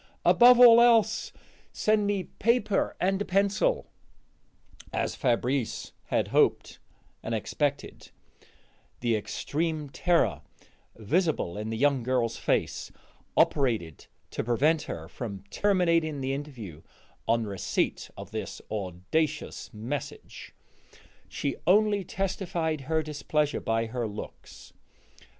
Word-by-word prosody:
Above 245 0 +7
all 235 -1 +9
else, 225 -2 +3 0.4
send 215 -1 +1
me 200 -2 0
paper 230 +2 0
and 190 +2 +1
a - - -1
pencil." 200 - +1 1.1
As - - -1
Fabrice 125 0 -1
had - - 0
hoped - - +1 0.4
and 115 - -3
expected, 140 +5 -3 0.9
the 120 -2 +1
extreme 150 +8 -3
terror 175 +2 +1 0.5
visible 145 - 0
in 105 +1 -4
the 115 - -3
young 140 +1 +2
girl's 120 -1 0
face - - -1 0.5
operated 110 - +1 0.2
to - - -3
prevent 145 +7 +2
her - - -6
from 100 -7 -7
terminating 170 -6 +1
the 135 0 -2
interview 120 - -7 0.5
on 115 0 +2
receipt 100 -3 -2
of - - -9
this - - -5
audacious 105 - -2
message; 120 +7 -7 0.7
she 140 - -3
only 205 +1 +4
testified 175 -5 -2
her 160 +3 0
displeasure 150 0 -1
by 115 0 0
her 115 0 -3
looks. 105 0 -10
145 Hz, 110 wpm, -28 LUFS, 115-190 Hz, 1.1 s, all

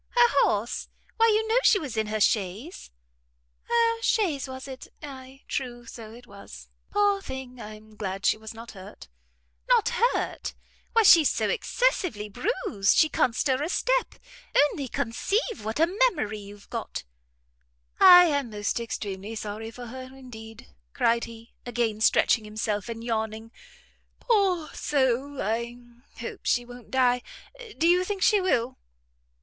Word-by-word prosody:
"Her 480 0 +6
horse? 215 +4 0 0.3
Why 455 0 +5
you 440 0 +2
know 455 +3 +3
she 440 - +5
was 290 - -5
in 220 -1 0
her 215 0 -2
chaise." 210 - -1 0.8
"Her 460 -1 +2
chaise, 345 - +1
was 260 +1 -8
it? 260 -1 -9 0.2
ay, 265 -1 -10
true, 240 -3 -4
so 225 -1 -10
it 240 +2 -13
was. 200 -3 -12 0.2
Poor 410 -1 +2
thing! 260 -5 -8
I 215 0 -8
am 215 0 -17
glad 195 -1 -4
she - - +4
was 220 0 -10
not 230 +1 -10
hurt." 195 0 -12 0.6
"Not - - +4
hurt? 480 +2 -1 0.4
Why 455 -1 +5
she's 335 -7 +7
so - - -1
excessively 370 - 0
bruised, 205 - 0
she 315 - +5
can't 240 -5 +1
stir 265 0 +1
a 310 - -2
step! - - 0 0.6
Only 280 -3 -5
conceive 250 - -2
what 220 +5 -3
a 325 - +6 0.2
memory 215 - -4
you've 200 0 -12
got!" - - -5 1.0
"I 355 -1 +10
am 285 -6 0
most 205 +1 -2
extremely 205 -1 -5
sorry 215 +1 -5
for 245 +2 -9
her 255 +2 -8
indeed," 225 -4 -11 0.3
cried 235 0 +2
he, 230 0 -13
again 230 -3 -2
stretching 225 0 +4
himself 210 0 -3
and 230 0 -6
yawning; 220 -1 -3 0.7
"poor 385 -8 +1
soul! 270 0 0
I 235 +3 -2 0.4
hope 230 - -6
she 245 0 +1
won't 245 0 -12
die. 250 -1 +2 0.6
Do 330 - +2
you 355 +1 +4
think 390 0 -3
she 415 -3 +4
will!" 255 -9 0
245 Hz, 150 wpm, -26 LUFS, 220-330 Hz, 1.0 s, I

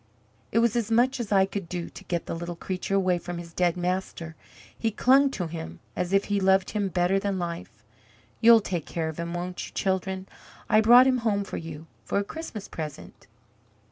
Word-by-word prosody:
It - - 0
was 230 -1 +3
as 230 -3 0
much 245 +3 +3
as 225 -4 -4
I 195 -1 +5
could 195 -3 -6
do 175 -1 -4
to - - -12
get 170 -2 -2
the - - -4
little 170 +1 -5
creature 185 +3 -3
away 185 -2 +2
from 175 0 -6
his 170 -1 -9
dead 175 0 +1
master; 175 -2 -3 0.4
he 225 - 0
clung 265 +6 +4
to 185 -9 -3
him 85 - -7 0.2
as 180 0 -2
if 195 0 +3
he 205 -1 0
loved 190 0 +3
him 205 -2 0
better 185 +1 +1
than 195 -1 -1
life. 170 - -6 0.6
You'll 230 0 +7
take 175 -6 -3
care 160 -2 -2
of 160 - -8
him, 170 +1 -4
won't 180 +1 -4
you, - - -13
children? 190 0 -1 0.4
I 215 - +5
brought 240 +3 +8
him 260 -1 +3
home 210 -3 0
to - - -5
you, 160 -1 -8 0.2
for 115 - -2
a 200 - +2
Christmas 225 -4 -7
present." 155 -3 -8
190 Hz, 205 wpm, -26 LUFS, 170-210 Hz, 0.6 s, brought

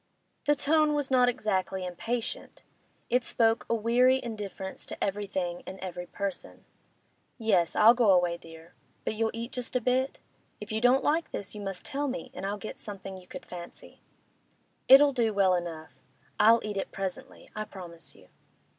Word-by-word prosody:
The 295 - +5
tone 305 +1 +3
was 290 -2 -1
not 250 -1 +5
exactly 190 -6 -1
impatient; 225 +6 -4 0.5
it 250 +1 +3
spoke 225 -1 +2
a 230 - +3
weary 245 +4 +4
indifference 205 -4 -6
to - - -6
everything 190 -3 -2
and 190 - -7
every 180 -1 -6
person. 200 -2 -5 0.7
'Yes, 195 -8 +2
I'll 225 +2 +8
go 240 -3 +3
away, 175 -2 +3
dear. 165 0 -14 0.3
But - - -1
you'll 225 +1 0
eat 230 +2 -6
just 250 0 -5
a - - +4
bit? 255 +2 0 0.4
If 210 +1 -8
you 220 0 -1
don't 250 +2 +4
like 320 +3 +1
this, 200 - -5
you 210 - -7
must 195 -2 -5
tell 285 +1 -2
me, 260 -1 -5
and 195 - -4
I'll 205 +1 -2
get 215 - -8
something 195 -2 -8
you 185 -1 -13
could - - -9
fancy.' 175 -1 -10 0.9
'It'll 280 +1 +8
do 230 -4 +1
well 190 -2 +4
enough. 170 -3 -4 0.5
I'll 225 +2 +6
eat 210 -1 -4
it 195 - -3
presently; 190 -2 -6
I 215 0 -3
promise 175 -5 -9
you. - - -19
210 Hz, 175 wpm, -29 LUFS, 190-245 Hz, 0.9 s, I'll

